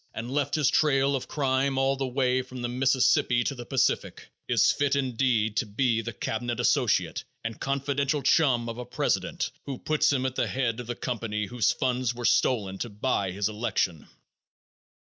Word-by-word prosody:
and 115 +3 -5
left 145 0 0
his 150 -2 +2
trail 140 -2 +3
of 130 - -4
crime 135 -1 0
all 135 0 +2
the 135 -1 -2
way 130 0 +1
from 125 -1 -8
the - - 0
Mississippi 125 -1 +2
to 140 - -1
the 120 -2 -9
Pacific, 135 -2 -1 0.2
is - - +4
fit, 140 -1 +1
indeed, 125 -5 +1
to 120 - +1
be 115 +2 +1
the 120 - -5
cabinet 120 +2 -3
associate 120 - +1 0.2
and 115 -1 -5
confidential 140 +1 -1
chum 130 -4 +3
of 115 +1 -5
a - - -4
president - - -1 0.2
who 135 -2 -4
puts 155 +2 +1
him 130 -2 0
at 130 - -1
the - - 0
head 125 -3 -1
of 120 - -7
the 120 - -3
company 110 -4 -3
whose 120 +2 +1
funds 125 -2 -1
were 120 0 -5
stolen 100 -8 +1
to 120 - -3
buy 105 -2 -1
his 100 +2 -1
election. 105 -7 -2
125 Hz, 185 wpm, -27 LUFS, 115-135 Hz, 0.2 s, is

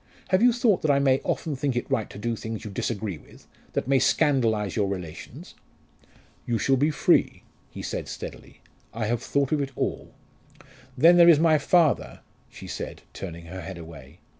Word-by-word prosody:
Have 185 +2 +3
you 245 +1 +6
thought 235 -5 +2
that 155 - 0
I 140 - +4
may 135 -1 +2
often 155 -3 -2
think 135 -1 -2
it 120 - -2
right 110 - -1
to - - -11
do 115 +3 -2
things 110 0 -6
you 105 - -6
disagree 100 -4 -3
with, - - -18 0.3
that - - -2
may 135 0 +3
scandalise 115 -8 +1
your 105 -3 +1
relations?" 90 -5 -7 0.9
"You 120 - +1
shall 135 +4 +2
be 145 +4 +2
free," 150 - +2 0.3
he - - -9
said - - -4
steadily. - - -9 0.3
"I 115 -1 -2
have 115 +2 -1
thought 140 -1 0
of 150 -2 +1
it 140 - -2
all." - - -4 0.8
"Then 170 +6 +6
there 170 0 +8
is 165 - +7
my 160 -1 +4
father," 160 0 +2 0.3
she - - -12
said, - - -7
turning 85 -3 -8
her 95 +3 -8
head 85 - -7
away. 80 -2 -12
120 Hz, 190 wpm, -25 LUFS, 100-150 Hz, 0.9 s, there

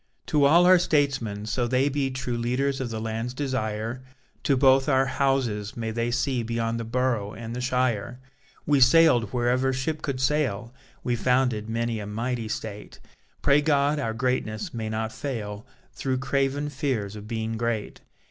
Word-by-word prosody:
To 145 -2 +3
all 170 +5 +6
our 185 0 +7
statesmen 135 -11 0
so 120 +2 -1
they 130 +3 +2
be 140 -1 0
True 130 -2 -3
leaders 130 +4 -1
of 125 - -3
the 110 -1 -4
land's 115 +3 -3
desire! 120 -3 -2 0.4
To 140 - +2
both 135 +1 +4
our 135 -1 +4
Houses, 130 -6 0
may 115 -1 -3
they 115 +1 -1
see 125 +1 0
Beyond 115 0 -2
the - - -3
borough 115 -3 -1
and 115 +1 -6
the 125 - -3
shire! 125 -2 0 0.5
We 145 -2 +3
sail'd 135 -3 +6
wherever 125 +2 +1
ship 140 +4 -2
could 135 -3 -3
sail, 130 -5 0 0.3
We 120 - 0
founded 125 -2 +1
many 115 0 -1
a 105 - -6
mighty 115 +2 -3
state; 105 -1 -6 0.4
Pray 140 +1 +5
God 145 0 +2
our 115 -5 -2
greatness 125 - -2
may 110 -2 -3
not 110 0 -3
fail 110 -7 -5 0.3
Through 130 -1 -2
craven 140 +2 0
fears 130 -8 -2
of 105 0 -9
being 110 0 -3
great. 115 -2 -3
125 Hz, 165 wpm, -26 LUFS, 110-135 Hz, 0.5 s, our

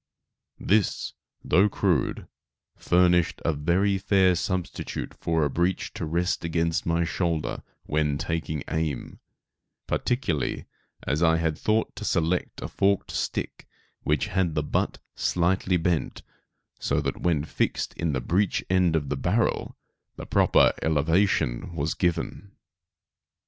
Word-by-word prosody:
This, 105 +1 +1 0.3
though 100 +3 +4
crude, 90 -9 0 0.5
furnished 90 -1 +3
a 80 - +2
very 95 +7 +1
fair 95 -1 +4
substitute 90 +2 -3
for 80 -1 0
a - - +1
breech 85 +5 0
to - - -4
rest 85 +3 0
against 85 0 0
my 85 0 +2
shoulder 85 -2 -1 0.2
when 75 -2 0
taking 80 -2 -3
aim, 80 -5 -3 0.7
particularly 120 - -1 0.4
as 70 +5 -1
I 80 -1 +4
had 80 -2 0
thought 110 +7 0
to - - -5
select 85 +2 0
a - - -3
forked 100 0 +1
stick - - -3 0.3
which 75 -2 +1
had 90 -4 0
the 75 - +1
butt - - -1 0.2
slightly 90 +1 +1
bent 85 -1 -1 0.6
so - - 0
that, - - -3
when 80 -4 +1
fixed - - -1
in 85 -3 -2
the 65 - -1
breech 95 +9 +1
end 90 -3 +3
of 75 -3 -1
the 75 - 0
barrel, 95 +12 0 0.4
the - - -8
proper - - +4
elevation 80 0 +1
was 75 0 -1
given. 90 +3 -2
85 Hz, 130 wpm, -26 LUFS, 80-95 Hz, 0.7 s, though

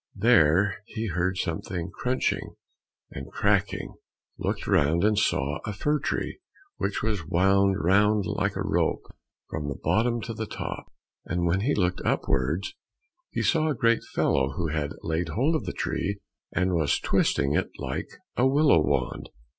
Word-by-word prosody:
There 95 -3 +4
he 110 -1 -4
heard 90 +2 0
something 90 0 -3
crunching 125 +4 -1 0.6
and 65 - -8
cracking, - - 0 0.5
looked - - -2
round, 80 +5 +3
and 105 +1 +4
saw 75 -5 +1
a 105 - -4
fir 150 +9 0
tree 145 - -3 0.4
which - - -2
was 105 -6 -1
wound 95 +3 +3
round 105 +3 +3
like - - -1
a - - -2
rope - - 0 0.5
from 75 -3 -3
the 70 - -3
bottom 120 +2 +2
to 115 - -5
the 110 0 -4
top, - - -6 0.3
and 90 0 -1
when 85 +2 +2
he 135 +7 +1
looked 90 -2 0
upwards 70 +8 0 0.6
he - - -2
saw 160 -1 +2
a 150 - 0
great 115 0 +3
fellow 70 0 +2
who 85 +2 -2
had 75 -1 -2
laid 80 +1 -1
hold 130 - +1
of 155 -10 -1
the 90 - -2
tree 100 +3 -2 0.3
and 95 -1 +1
was 80 -4 +2
twisting 70 0 +1
it - - 0
like - - -4 0.3
a 125 - +3
willow 140 - +5
wand. 70 -5 -1
95 Hz, 160 wpm, -26 LUFS, 80-110 Hz, 0.6 s, willow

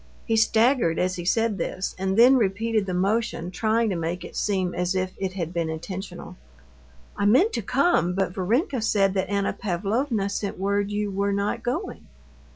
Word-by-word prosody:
He 225 - +1
staggered 220 - +3
as 185 0 0
he 175 - -5
said 225 +1 +1
this, 185 +3 -3
and 190 +1 -2
then 250 +3 +7
repeated 220 -1 0
the 185 - -2
motion, 195 -2 -1
trying 220 +2 +1
to - - -1
make 170 +1 -3
it - - -11
seem 190 -3 0
as 180 +1 -1
if 185 0 -1
it 190 -1 -2
had 175 -3 -4
been 170 -2 -1
intentional. 185 +5 -7 0.8
"I 205 -1 +1
meant 290 - +4
to 235 - -1
come, 250 - +2
but 190 -2 -1
Varenka 235 - 0
said 200 -3 +2
that 190 -1 -1
Anna 200 -1 0
Pavlovna 210 +4 -1
sent 200 0 -3
word 200 +1 0
you 205 0 -2
were 200 +1 0
not 200 +1 -1
going." 320 +11 -4
200 Hz, 180 wpm, -25 LUFS, 185-225 Hz, 0.8 s, then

